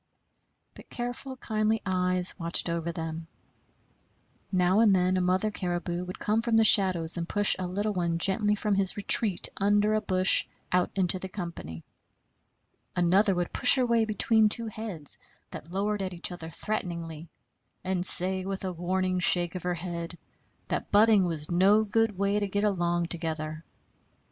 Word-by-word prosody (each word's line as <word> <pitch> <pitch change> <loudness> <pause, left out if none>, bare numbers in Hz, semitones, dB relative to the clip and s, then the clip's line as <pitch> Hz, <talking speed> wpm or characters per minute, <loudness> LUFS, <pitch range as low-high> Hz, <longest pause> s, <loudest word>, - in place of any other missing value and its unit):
But - - -16
careful, 245 +2 -6
kindly 220 -2 -1
eyes 180 -1 0
watched 170 +1 0
over 170 0 -3
them. 165 0 -6 1.2
Now 185 +1 +2
and 215 -4 +4
then 185 0 +1
a 185 - 0
mother 185 +4 0
caribou 175 -2 -4
would 180 - -8
come 215 +2 -1
from 230 -1 0
the 225 - +5
shadows 180 -6 +4
and 170 0 -5
push 205 -1 +3
a 185 - -3
little 205 +4 -3
one 170 -3 -1
gently 205 +4 +1
from 210 0 -2
his 195 0 0
retreat 205 -1 +3
under 205 +1 +1
a 215 - 0
bush 185 -2 +4 0.3
out 180 -1 +1
into 185 -1 +2
the 190 - -8
company. 170 - -8 1.1
Another 185 +3 +2
would 175 -1 -3
push - - +6
her 255 -2 +1
way 230 -2 +1
between 220 0 +2
two 230 +2 +5
heads 200 -9 -7 0.3
that 160 - -10
lowered 205 +2 -2
at 185 -1 -5
each 170 - -3
other 165 -2 -8
threateningly, 170 -4 -6 0.5
and 185 -1 -2
say 185 +1 +3
with 195 0 -5
a 185 - -4
warning 185 +1 -2
shake 175 -1 +3
of 185 - -6
her 180 0 -2
head 170 0 -5 0.5
that - - -4
butting 210 -2 +4
was 160 -1 -2
no 195 +5 +3
good 220 -1 -1
way 200 +1 0
to 205 - -2
get 205 +1 -2
along 175 -4 0
together. 160 -2 -4
185 Hz, 165 wpm, -27 LUFS, 175-210 Hz, 1.2 s, push